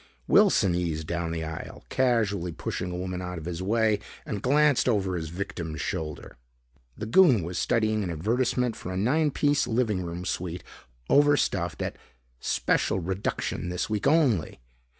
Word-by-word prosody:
Wilson 95 Hz, -3 st, +5 dB
eased 85 Hz, -3 st, -2 dB
down 85 Hz, 0 st, -2 dB
the 80 Hz, -1 st, -3 dB
aisle, 80 Hz, 0 st, -7 dB
casually 105 Hz, -9 st, +1 dB
pushing 90 Hz, +2 st, -4 dB
a 90 Hz, -, -4 dB
woman 90 Hz, 0 st, -4 dB
out 90 Hz, -1 st, -5 dB
of 80 Hz, -, -7 dB
his 85 Hz, 0 st, -4 dB
way, 110 Hz, +1 st, +2 dB, 0.3 s
and 110 Hz, -10 st, -4 dB
glanced 145 Hz, 0 st, +3 dB
over 95 Hz, -5 st, +1 dB
his 80 Hz, -2 st, -4 dB
victim's 85 Hz, -3 st, -5 dB
shoulder. 75 Hz, -2 st, -4 dB, 0.6 s
The 110 Hz, -, -4 dB
goon 125 Hz, -, +5 dB
was 85 Hz, +2 st, -3 dB
studying 110 Hz, -1 st, +1 dB
an 90 Hz, -, -3 dB
advertisement 115 Hz, +7 st, 0 dB
for 90 Hz, -, -7 dB
a 90 Hz, -, -3 dB
nine 145 Hz, +10 st, +2 dB
piece 145 Hz, +1 st, +1 dB
living 110 Hz, -5 st, 0 dB
room 85 Hz, +1 st, -5 dB
suite, 90 Hz, -1 st, -3 dB, 0.4 s
overstuffed, 140 Hz, -, +2 dB
at -, -, -4 dB, 0.4 s
"special -, -, +1 dB
reduction 95 Hz, -1 st, -2 dB
this 90 Hz, +4 st, -3 dB
week 105 Hz, -2 st, 0 dB
only." 140 Hz, -, +2 dB
95 Hz, 155 wpm, -27 LUFS, 85-115 Hz, 0.6 s, Wilson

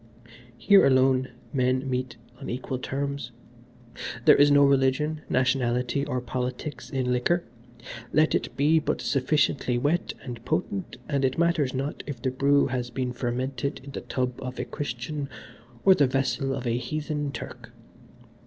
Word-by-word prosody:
Here 200 Hz, -1 st, +6 dB
alone 130 Hz, 0 st, +4 dB, 0.3 s
men 130 Hz, 0 st, +1 dB
meet 125 Hz, -2 st, -2 dB, 0.2 s
on 140 Hz, -, -7 dB
equal 130 Hz, +1 st, -3 dB
terms. 140 Hz, -1 st, -3 dB, 0.9 s
There -, -, +8 dB
is 145 Hz, 0 st, +6 dB
no 145 Hz, 0 st, +6 dB
religion, 140 Hz, +3 st, +2 dB
nationality 125 Hz, 0 st, +1 dB
or 125 Hz, -, -1 dB
politics 125 Hz, +4 st, -4 dB
in 130 Hz, -2 st, -1 dB
liquor: 170 Hz, +8 st, +1 dB, 0.7 s
let 155 Hz, +1 st, +3 dB
it -, -, -2 dB
be 150 Hz, +3 st, +4 dB
but 155 Hz, -, -1 dB
sufficiently 135 Hz, -2 st, +1 dB
wet 145 Hz, +8 st, 0 dB
and 120 Hz, -3 st, -7 dB
potent 180 Hz, +5 st, -2 dB
and 140 Hz, -2 st, 0 dB
it 130 Hz, -1 st, +1 dB
matters 165 Hz, -6 st, +2 dB
not 140 Hz, +3 st, -3 dB
if 140 Hz, -5 st, -5 dB
the 130 Hz, -, -1 dB
brew 140 Hz, +2 st, +3 dB
has 125 Hz, -2 st, -2 dB
been 125 Hz, 0 st, -3 dB
fermented 125 Hz, +2 st, -2 dB
in 140 Hz, -, -9 dB
the -, -, -5 dB
tub 125 Hz, -1 st, -3 dB
of 125 Hz, -1 st, -6 dB
a -, -, -2 dB
Christian 140 Hz, +1 st, -4 dB, 0.6 s
or 195 Hz, -, +9 dB
the 145 Hz, -6 st, +3 dB
vessel 135 Hz, +1 st, 0 dB
of 125 Hz, -, -5 dB
a 120 Hz, 0 st, +1 dB
heathen 150 Hz, 0 st, -3 dB
Turk. -, -, -8 dB
135 Hz, 155 wpm, -26 LUFS, 125-145 Hz, 0.9 s, or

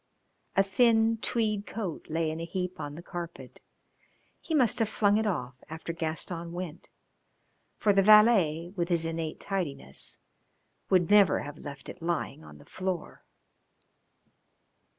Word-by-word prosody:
A 195 Hz, -, +5 dB
thin 225 Hz, +2 st, +3 dB
tweed 215 Hz, -3 st, 0 dB
coat 200 Hz, -8 st, -5 dB
lay 160 Hz, 0 st, 0 dB
in 160 Hz, -, -5 dB
a -, -, -4 dB
heap 180 Hz, +1 st, -4 dB
on 145 Hz, 0 st, -5 dB
the 170 Hz, -, -9 dB
carpet 175 Hz, -2 st, -8 dB, 0.8 s
he 320 Hz, -, -3 dB
must 250 Hz, -5 st, +3 dB
have 225 Hz, -2 st, +2 dB
flung 205 Hz, -1 st, +3 dB
it 220 Hz, -, 0 dB
off 125 Hz, -9 st, -3 dB
after 160 Hz, +1 st, -5 dB
Gaston 165 Hz, +1 st, -3 dB
went, 175 Hz, -3 st, -7 dB, 0.9 s
for 205 Hz, -, +3 dB
the 195 Hz, -, +5 dB
valet, 195 Hz, -6 st, +5 dB
with 170 Hz, -2 st, -1 dB
his 170 Hz, -2 st, +1 dB
innate 165 Hz, -1 st, -3 dB
tidiness, 145 Hz, -, -3 dB, 0.7 s
would 185 Hz, 0 st, +3 dB
never 200 Hz, -6 st, +6 dB
have 145 Hz, +1 st, -8 dB
left 140 Hz, -1 st, -8 dB
it 180 Hz, -, -9 dB
lying 170 Hz, -, -2 dB
on 75 Hz, -1 st, -13 dB
the -, -, -16 dB
floor. 185 Hz, -3 st, -4 dB
175 Hz, 145 wpm, -29 LUFS, 160-205 Hz, 0.9 s, never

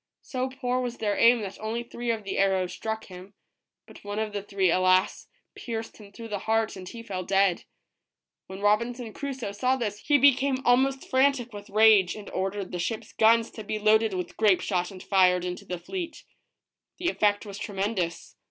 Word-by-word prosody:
So 255 Hz, 0 st, -3 dB
poor 255 Hz, -1 st, -2 dB
was 245 Hz, -1 st, -4 dB
their 205 Hz, -2 st, -1 dB
aim 235 Hz, 0 st, +5 dB
that 195 Hz, -2 st, -7 dB
only 225 Hz, +2 st, -3 dB
three 240 Hz, 0 st, -6 dB
of 225 Hz, -2 st, -1 dB
the 195 Hz, -, -3 dB
arrows 190 Hz, -2 st, +1 dB
struck 220 Hz, 0 st, -4 dB
him, 185 Hz, +2 st, -12 dB, 0.5 s
but -, -, -15 dB
one 205 Hz, 0 st, -5 dB
of 215 Hz, -1 st, -2 dB
the 205 Hz, -, -3 dB
three, 195 Hz, -3 st, +1 dB
alas, 185 Hz, +1 st, +2 dB, 0.3 s
pierced 225 Hz, -2 st, -6 dB
him 205 Hz, -2 st, -14 dB
through 230 Hz, +3 st, -9 dB
the 205 Hz, -2 st, -3 dB
heart 225 Hz, 0 st, +1 dB
and 185 Hz, -1 st, -8 dB
he 230 Hz, -1 st, -9 dB
fell 190 Hz, -4 st, -4 dB
dead. 195 Hz, -1 st, +2 dB, 0.8 s
When 190 Hz, +1 st, -9 dB
Robinson 230 Hz, +2 st, 0 dB
Crusoe 265 Hz, -7 st, -5 dB
saw 250 Hz, +6 st, +1 dB
this 210 Hz, -5 st, -3 dB
he 290 Hz, +4 st, +3 dB
became 270 Hz, -1 st, +3 dB
almost 265 Hz, +2 st, +2 dB
frantic 260 Hz, -3 st, +2 dB
with 205 Hz, 0 st, -9 dB
rage, 210 Hz, -3 st, +5 dB
and 210 Hz, -1 st, -9 dB
ordered 195 Hz, 0 st, -3 dB
the 180 Hz, -, -4 dB
ship's 220 Hz, +5 st, -4 dB
guns 225 Hz, +1 st, +4 dB
to 220 Hz, -, -8 dB
be 215 Hz, +1 st, -3 dB
loaded 215 Hz, -1 st, +3 dB
with 180 Hz, -1 st, -5 dB
grape 210 Hz, -4 st, +4 dB
shot 180 Hz, -3 st, -1 dB
and 190 Hz, -2 st, -11 dB
fired 180 Hz, -2 st, +3 dB
into 180 Hz, 0 st, -5 dB
the 180 Hz, -, -4 dB
fleet. 340 Hz, -, -6 dB, 0.7 s
The 350 Hz, -1 st, 0 dB
effect 205 Hz, -7 st, +1 dB
was 200 Hz, 0 st, -8 dB
tremendous. 195 Hz, -4 st, -3 dB
215 Hz, 190 wpm, -27 LUFS, 195-240 Hz, 0.8 s, aim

